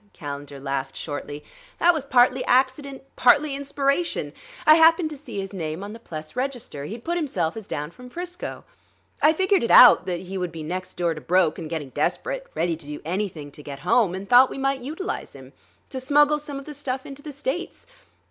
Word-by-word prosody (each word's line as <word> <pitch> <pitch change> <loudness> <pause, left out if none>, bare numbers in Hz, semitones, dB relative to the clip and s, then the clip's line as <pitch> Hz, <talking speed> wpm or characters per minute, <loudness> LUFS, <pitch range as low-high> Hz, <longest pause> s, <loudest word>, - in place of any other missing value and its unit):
Calendar 145 -2 -7
laughed 135 -1 -3
shortly. 145 -1 -6 0.3
"That 350 +1 +5
was 310 -4 -3
partly 255 -1 +4
accident, 265 +2 +1
partly 285 +4 +4
inspiration. 280 +3 -1 0.3
I 310 - +9
happened 325 0 +5
to - - -6
see 280 -8 -7
his 195 +1 -5
name 165 -1 -4
on 205 +1 -7
the 230 - -10
Pless 155 -6 -8
register; 250 - -4
he'd 225 +8 -7
put 345 +1 -1
himself 185 - -1
down 150 +1 -4
as - - -21
from 250 0 -12
'Frisco. 355 +5 -6 0.6
I 305 - +6
figured 375 +2 +2
it 230 - -1
out 245 -6 +8
that 175 -2 -2
he 190 +1 -6
would 180 -2 -3
be 160 -1 -7
next 185 +4 -5
door 170 -2 +1
to 155 - -9
broke 180 -1 +2
and 155 - -6
getting 155 -4 -4
desperate, - - -2
ready 170 -1 0
to 150 - -13
do 150 0 -6
anything 170 -5 -3
to 150 - -12
get 140 -1 -8
home; 185 +2 +2
and 195 +1 -7
thought 250 +3 +7
we - - -7
might 270 -1 0
utilize 315 +10 -5
him; - - -13 0.4
to 265 - -4
smuggle 295 +3 +3
some 290 -1 -7
of 275 - -8
the 300 - -8
stuff 265 -2 -4
into 275 0 -9
the 300 - -8
States. 290 +5 -4
245 Hz, 205 wpm, -24 LUFS, -, 0.6 s, I